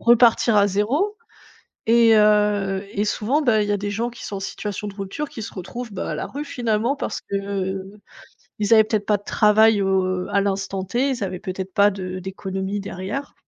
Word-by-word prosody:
repartir 235 -1 +5
à 205 - +5
0 255 - 0 0.7
et 230 0 +6
heu, 210 -2 +3
et 205 0 -1
souvent, 220 +7 0
bah, 235 -7 +3
il 205 - -3
y - - +1
a - - +2
des 205 +1 -4
gens 235 +3 -2
qui 240 - -11
sont 200 - -5
en - - -5
situation 205 +1 -5
de 200 - -9
rupture 200 +9 -5
qui 225 - -8
se - - -8
retrouvent, 230 +5 -7
bah, 190 - -4
à - - -2
la - - -3
rue, 290 +2 -6
finalement, 240 -1 -1
parce - - -4
que, 200 - -4
heu, 195 0 -4 0.6
ils 210 +2 +3
avaient 220 - +7
peut-être 215 -2 -1
pas 210 - +3
de 205 - -16
travail, 215 0 +4
heu, 185 -1 0
à 200 0 +2
l'instant 195 -1 -2
T, 240 +8 0
ils 235 -6 -2
avaient 185 -1 -4
peut-être 190 -1 -5
pas 200 +2 +5
de 185 -2 -5
d'économie 190 +1 -4
derrière. 200 +8 -5
205 Hz, 210 wpm, -22 LUFS, 195-225 Hz, 0.7 s, avaient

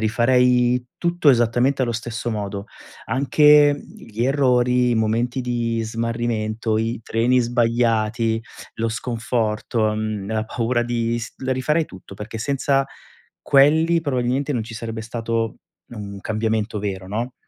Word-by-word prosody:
rifarei 125 +2 +3
tutto 170 -3 +1
esattamente 120 +2 +2
allo 120 - 0
stesso 120 +1 -4
modo, 100 -2 -4 0.4
anche, 145 +2 +5
mhmm, - - -13
gli 115 +2 -4
errori, 125 -2 +2
i - - +2
momenti 115 +4 0
di 115 -2 -1
smarrimento, 115 -1 -2
i 115 +1 -2
treni 120 +4 +2
sbagliati, 115 -1 +1 0.4
lo 115 +1 -1
sconforto, 115 -1 -1
mhmm, 110 -2 -3
la 110 0 -1
paura 120 +1 -1
di 120 -1 -1
s 115 - -7
la 130 - 0
rifarei 150 +5 +1
tutto, 95 -5 -13
perché 105 +3 -7
senza 135 +2 +1 0.6
quelli, 160 +4 +4
probabilmente, 135 -1 -1
non 120 -4 -1
ci 115 +2 -9
sarebbe 115 0 -5
stato 115 -1 -2 0.3
un 100 -4 -8
cambiamento 110 0 -1
vero, 95 -2 -4
no? 115 +5 -3
115 Hz, 135 wpm, -22 LUFS, 110-125 Hz, 0.6 s, anche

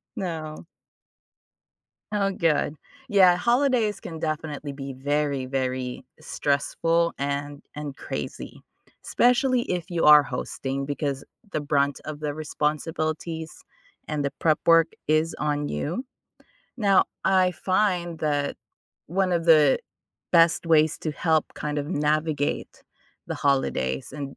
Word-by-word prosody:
No. 160 -3 -5 1.5
Oh 200 -2 +1
good, 155 -4 +1 0.3
yeah, 185 -4 +6
holidays 235 -2 +2
can 160 -2 -8
definitely 155 -2 -3
be 135 -1 -6
very, 140 0 -1
very 130 -1 -2 0.2
stressful 165 +4 0
and 140 +1 -3
and 145 -2 -6
crazy, - - -6 0.4
especially 250 +1 +3
if 180 -3 -3
you 170 -2 0
are 150 -1 +9
hosting, 135 0 -4
because 140 -1 -3 0.3
the 155 - -1
brunt 140 -1 +1
of 155 -1 -6
the 150 -1 -3
responsibilities 155 +1 -3 0.4
and 150 -1 -2
the 140 - -1
prep 155 -2 +2
work 165 -1 +6 0.2
is 155 +2 +2
on 145 -1 -1
you, 160 - -3 0.7
now, 200 -5 +4 0.2
I 185 -1 +3
find 180 -2 0
that 145 -2 -1 0.5
one 185 +2 0
of 170 -1 0
the 155 -4 +6 0.5
best 165 0 +4
ways 155 -1 +3
to 155 - -3
help 160 0 +1
kind 150 0 -3
of 145 - -3
navigate 150 -2 -1 0.4
the - - -3
holidays 100 - 0
and 140 -1 -6
155 Hz, 120 wpm, -25 LUFS, 145-170 Hz, 1.5 s, are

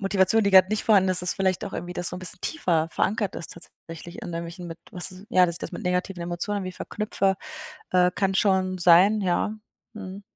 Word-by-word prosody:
Motivation, 195 +2 +3
die 200 - +2
gerade 190 -1 +7
nicht 215 0 -1
vorhanden 195 -4 +4
ist, 180 -1 0
ist 180 - +2
vielleicht 190 -1 0
auch 200 - -7
irgendwie 175 +1 -5
das 175 0 -1
so 180 - -5
'n - - -7
bisschen 185 0 -4
tiefer 165 - 0
verankert 205 +2 -1
ist 170 - -6
tatsächlich, 170 0 -10
an 175 - -6
irgendwelchen, 170 +1 -6
mit 165 0 -8
was 185 +2 -5
ja, 185 -7 +5
dass 170 - -3
ich - - -6
das - - -5
mit - - -6
negativen 180 0 -1
Emotionen 175 +4 -2
irgendwie 185 -2 -5
verknüpfe, 195 0 -1 0.6
äh, 180 -1 +4
kann 195 -1 0
schon 190 -1 +1
sein, 180 +5 +6
ja. 190 +3 0 0.4
Mhm. 200 -1 -8
185 Hz, 215 wpm, -25 LUFS, 175-195 Hz, 0.6 s, gerade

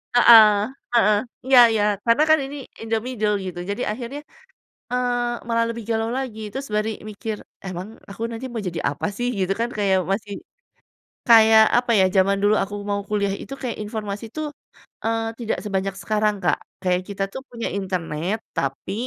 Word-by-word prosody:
Heeh 215 -4 +8 0.3
heeh. 215 -3 +5 0.3
Iya 260 -2 +7
iya 215 -2 +1 0.2
karena 230 +6 +4
kan 315 - +7
ini, 280 +2 -7 0.3
in 225 - -7
the 225 - +3
middle 215 -4 0
gitu 175 -1 -6
jadi 205 +5 -3
akhirnya, 250 +5 -6 0.7
eee, 250 -1 0 0.3
malah 230 0 +2
lebih 230 -1 -5
galau 225 0 0
lagi 245 -5 -4
terus 275 +1 -5
baru 215 +1 +1 0.2
mikir, 215 0 -5 0.3
emang 185 +2 -5 0.2
aku 210 - -10
nanti 230 +3 -6
mau 225 -3 -4
jadi 170 -1 -3
apa 145 - -4
sih? 245 0 -1
Gitu 190 +1 0
kan 235 +1 0
kayak 195 -2 +2
masih, 205 0 -2 1.0
kayak, 220 -1 +8
apa 245 -1 +1
ya, - - +6
jaman 195 +1 +4
dulu 205 +1 +4
aku 205 +1 -6
mau 200 0 0
kuliah 200 -2 0
itu, 275 - -8
kayak 245 -3 -3
informasi 210 0 -5
tuh, 310 -1 -3 0.6
eee, 225 0 0 0.2
tidak 225 -2 -2
sebanyak 195 -1 -2
sekarang 210 -1 +1
Kak, 175 - +2 0.3
kayak 180 0 +1
kita 195 0 -2
tuh 265 - -5
punya 235 -1 -4
internet 185 0 -2 0.2
tapi, 135 +7 -2
215 Hz, 175 wpm, -22 LUFS, 200-235 Hz, 1.0 s, Heeh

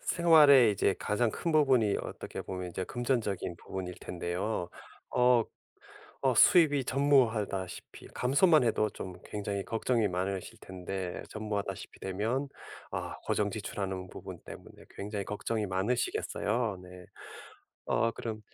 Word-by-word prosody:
생활에 150 -8 +6
이제 100 -1 +1
가장 110 +2 +1
큰 170 - -2
부분이 130 -9 +4
어떻게 - - -6
보면 90 -1 -5
이제 95 - -3
금전적인 115 -7 -2
부분일 90 +1 -6
텐데요. 90 +2 -3 0.5
어. 125 -2 +5 0.8
어 130 - +3
수입이 145 - +6
전무하다시피 115 -9 0
감소만 150 +4 +4
해도 110 -2 +2
좀 95 - -7
굉장히 100 -1 -3
걱정이 115 -1 +1
많으실 95 +1 -3
텐데 95 0 -5
전무하다시피 105 -3 -5
되면 110 +9 -2 0.4
아 - - -4
고정 105 -1 +1
지출하는 95 -3 -4
부분 - - -9
때문에 - - -12
굉장히 100 0 -5
걱정이 105 +1 -2
많으시겠어요 105 +1 -1
네. 90 0 -12 0.8
어 115 0 +2
그럼 110 -2 -5
105 Hz, 300 characters per minute, -30 LUFS, 95-125 Hz, 0.8 s, 생활에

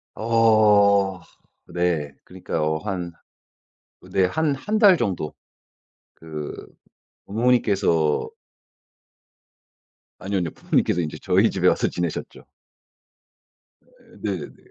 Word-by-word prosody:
어 105 -4 +3 0.4
네. 85 -5 -2
그러니까 90 -3 -5
어 80 0 0
한 90 -2 -4 0.9
어 - - -17
네 95 -1 +2
한 155 +2 0
1 210 +11 -2
달 205 -4 +7
정도 95 - -3 0.8
그 75 -2 -7 0.7
부모님께서 100 - +1 1.9
아니요, 100 +1 -3
아니요. 85 -3 -3
부모님께서 90 - 0
인제 80 -2 -5
저희 - - +3
집에 - - 0
와서 - - +2
지내셨죠. 85 -2 -5 1.4
어 - - -36 0.4
네네네. 95 -8 -4
95 Hz, 190 characters per minute, -23 LUFS, 85-110 Hz, 1.9 s, 달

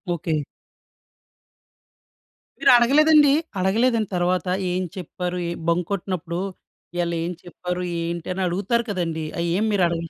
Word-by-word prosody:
Okay. 155 -2 -1 2.2
మీరు - - +6
అడగలేదండి, 295 +4 +6 0.3
అడగలేదండి 220 +3 +2
తరువాత 180 +1 0 0.2
ఏం 180 +1 0
చెప్పారు 180 -1 -4
ఏం 170 - -3
బంక్ 170 0 +1
కొట్టినప్పుడు, 180 -3 -3 0.6
ఇయళ 175 -1 0
ఏం 175 - -2
చెప్పారు? 180 0 -4 0.2
ఏంటి? 170 0 -4
అని 190 - -3
అడుగుతారు 205 +7 0
కదండీ. 165 -5 -2
అవి 170 0 0
ఏమి 220 +2 +1
మీరు 195 -3 +3
అడగలే? 165 -1 -3
180 Hz, 125 wpm, -23 LUFS, 170-205 Hz, 2.2 s, మీరు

